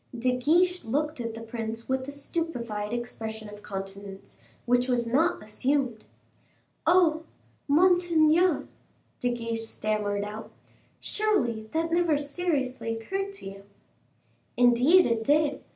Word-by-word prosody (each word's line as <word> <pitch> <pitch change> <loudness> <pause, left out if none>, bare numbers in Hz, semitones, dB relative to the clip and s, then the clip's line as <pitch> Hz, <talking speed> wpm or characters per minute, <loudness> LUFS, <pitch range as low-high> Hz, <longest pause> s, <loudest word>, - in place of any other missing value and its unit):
De 250 +1 +1
Guiche 350 +7 +2
looked 295 +4 -1
at 230 -1 -4
the 225 - -7
prince 225 0 -5
with 260 0 -1
a - - -5
stupefied 245 -9 -3
expression 225 -2 -5
of 210 0 -11
countenance, 195 0 -8 0.3
which 245 +1 +2
was 245 -2 +1
not 270 +6 +1
assumed. 250 +1 -1 0.8
"Oh! 330 -2 +4 0.5
monseigneur," 340 0 +4 0.5
De 245 - +1
Guiche 230 -1 -3
stammered 210 -2 -1
out; 210 +2 -7 0.5
"surely, 240 - 0
that 330 +1 0
never 340 -3 +3
seriously 285 -6 -2
occurred 390 - -3
to 395 - -10
you." 195 0 -9 0.9
"Indeed 250 +9 +6
it 230 -1 0
did. 290 +2 +2
250 Hz, 120 wpm, -27 LUFS, 225-320 Hz, 0.9 s, Indeed